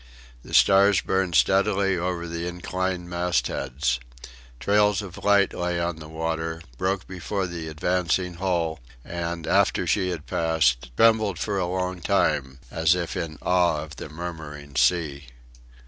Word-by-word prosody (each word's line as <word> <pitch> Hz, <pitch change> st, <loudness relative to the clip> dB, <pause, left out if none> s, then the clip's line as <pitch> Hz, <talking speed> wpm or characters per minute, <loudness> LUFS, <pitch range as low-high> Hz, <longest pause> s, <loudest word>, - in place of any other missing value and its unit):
The -, -, -5 dB
stars 100 Hz, 0 st, +6 dB
burned 95 Hz, -2 st, 0 dB
steadily 95 Hz, -, +3 dB
over 85 Hz, -1 st, -2 dB
the 85 Hz, +1 st, -4 dB
inclined 90 Hz, 0 st, -3 dB
mastheads. 75 Hz, -8 st, -1 dB, 0.6 s
Trails 105 Hz, +3 st, +3 dB
of 90 Hz, -3 st, -10 dB
light 100 Hz, -1 st, +4 dB
lay 90 Hz, 0 st, -1 dB
on 85 Hz, -1 st, -2 dB
the 75 Hz, -1 st, -10 dB
water, 80 Hz, 0 st, -3 dB, 0.2 s
broke 95 Hz, +1 st, -1 dB
before 95 Hz, +1 st, -3 dB
the 85 Hz, -2 st, -6 dB
advancing 90 Hz, +3 st, 0 dB
hull, 85 Hz, -4 st, 0 dB, 0.3 s
and, 85 Hz, -1 st, -4 dB
after -, -, +2 dB
she 95 Hz, -3 st, +1 dB
had 85 Hz, -4 st, -5 dB
passed, 75 Hz, -8 st, +1 dB
trembled 110 Hz, -4 st, +4 dB
for 100 Hz, +1 st, -1 dB
a 90 Hz, -, 0 dB
long 90 Hz, 0 st, -2 dB
time 65 Hz, -5 st, +1 dB
as 80 Hz, +2 st, +3 dB
if 85 Hz, -2 st, -3 dB
in 80 Hz, -2 st, -4 dB
awe 85 Hz, -4 st, +2 dB
of 80 Hz, -2 st, -11 dB
the -, -, -7 dB
murmuring 75 Hz, -3 st, -8 dB
sea. 75 Hz, -5 st, +1 dB
85 Hz, 145 wpm, -25 LUFS, 80-95 Hz, 0.6 s, stars